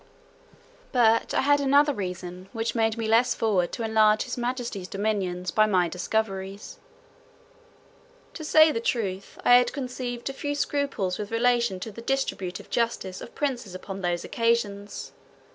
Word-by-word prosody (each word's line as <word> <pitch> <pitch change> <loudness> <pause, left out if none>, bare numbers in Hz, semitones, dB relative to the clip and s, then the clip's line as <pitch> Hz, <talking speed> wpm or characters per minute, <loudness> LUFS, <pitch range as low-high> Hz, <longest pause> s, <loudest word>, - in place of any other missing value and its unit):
But 230 -3 +3
I - - +3
had 285 +1 +4
another 285 +2 +4
reason, 180 -2 -6
which 225 -1 -2
made 225 -1 +1
me 225 -1 -2
less 230 +3 +3
forward 195 -6 +1
to 230 - -3
enlarge 215 -1 +4
his 245 - -5
majesty's 240 -6 -3
dominions 190 -4 -2
by 215 +3 +4
my 185 -4 +2
discoveries. 195 +2 -3 1.5
To 320 - -7
say 315 0 +6
the 230 - -1
truth, 200 -5 -2
I 245 - +7
had 245 0 +6
conceived 250 -3 -5
a 275 - -3
few 290 +1 -3
scruples 280 -11 -1
with 205 -1 -4
relation 235 -3 +1
to 220 - -5
the 230 - -10
distributive 230 -8 -3
justice 230 -5 -1
of - - -10
princes 250 -9 -2
upon 195 +1 -7
those 175 -1 -1
occasions. 215 -3 -1
225 Hz, 150 wpm, -26 LUFS, 195-245 Hz, 1.5 s, I